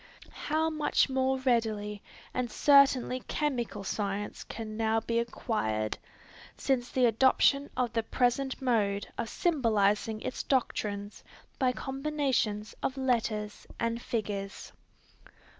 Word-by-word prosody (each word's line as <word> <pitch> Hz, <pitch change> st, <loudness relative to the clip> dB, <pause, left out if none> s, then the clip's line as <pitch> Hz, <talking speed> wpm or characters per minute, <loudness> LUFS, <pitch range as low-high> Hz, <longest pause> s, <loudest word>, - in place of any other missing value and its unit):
How 315 Hz, +1 st, +1 dB
much 305 Hz, -2 st, +2 dB
more 265 Hz, 0 st, +1 dB
readily 220 Hz, -5 st, 0 dB, 0.3 s
and 250 Hz, -1 st, -1 dB
certainly 275 Hz, -2 st, +4 dB
chemical 245 Hz, -8 st, -2 dB
science 200 Hz, +1 st, -3 dB
can 220 Hz, -1 st, -7 dB
now 225 Hz, 0 st, +2 dB
be 230 Hz, +1 st, -1 dB
acquired, 110 Hz, -, -1 dB, 0.6 s
since 250 Hz, -2 st, 0 dB
the 255 Hz, -1 st, +3 dB
adoption 265 Hz, +4 st, +4 dB
of 250 Hz, -2 st, 0 dB
the 230 Hz, -, +2 dB
present 250 Hz, +3 st, 0 dB
mode 210 Hz, -6 st, +1 dB
of 225 Hz, -, -2 dB
symbolizing 220 Hz, -, +1 dB
its -, -, -3 dB
doctrines 205 Hz, -6 st, -1 dB, 0.4 s
by 260 Hz, -3 st, +3 dB
combinations 265 Hz, -6 st, -1 dB
of 265 Hz, -, -2 dB
letters 225 Hz, -5 st, -1 dB
and 230 Hz, 0 st, -1 dB
figures. 200 Hz, -4 st, -4 dB
235 Hz, 110 wpm, -30 LUFS, 210-265 Hz, 0.6 s, certainly